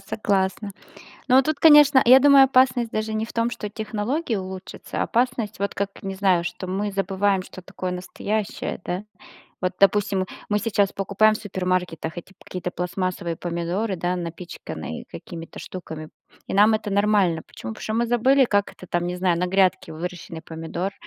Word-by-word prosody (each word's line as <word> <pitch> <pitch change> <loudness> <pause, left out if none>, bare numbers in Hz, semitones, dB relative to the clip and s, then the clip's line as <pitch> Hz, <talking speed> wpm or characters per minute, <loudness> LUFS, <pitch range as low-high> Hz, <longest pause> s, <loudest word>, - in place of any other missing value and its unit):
согласна. 200 -1 -1 0.6
Но 255 - +4
вот 265 - +6
тут, 310 -2 -1
конечно, 295 -4 +7
я 255 +2 +9
думаю, 275 -1 +7
опасность 255 -3 +3
даже 215 0 -2
не 215 +1 -1
в - - -12
том, 230 +1 +1
что 210 -3 -5
технологии 220 +5 -2
улучшатся, 190 0 -6
опасность 235 -4 -1
вот 200 - -2
как, 200 0 -1
не 195 0 -4
знаю, 190 -3 +2
что 185 - -5
мы 200 +2 -2
забываем, 195 0 0
что 185 - -11
такое 185 0 -5
настоящее, 200 +4 -3
да? 180 +3 -3 0.6
Вот, 185 -1 0
допустим, 200 0 +3
мы 185 - -1 0.2
мы 210 - +3
сейчас 205 -2 +1
покупаем 200 +2 +2
в - - -5
супермаркетах 180 -5 -2
эти 175 +2 -9
какие-то 180 -1 -5
пластмассовые 180 -1 -3
помидоры, 175 +4 -2
да, 175 +2 -1
напичканные 170 0 -7
какими-то 165 -2 -9
штуками, 160 -4 -8 0.4
и - - -4
нам 210 +2 +6
это 215 -1 -2
нормально. 200 -5 +2
Почему? 110 - -8
Потому - - -11
что 215 - -3
мы 235 +1 +1
забыли, 255 +3 +4
как 205 -3 0
это 185 - -13
там, 175 0 -1
не 180 0 -3
знаю, 180 -2 +1
на 180 - 0
грядке 190 -3 +1
выращенный 165 0 -6
помидор. 165 +4 -4
195 Hz, 175 wpm, -23 LUFS, 180-220 Hz, 0.6 s, я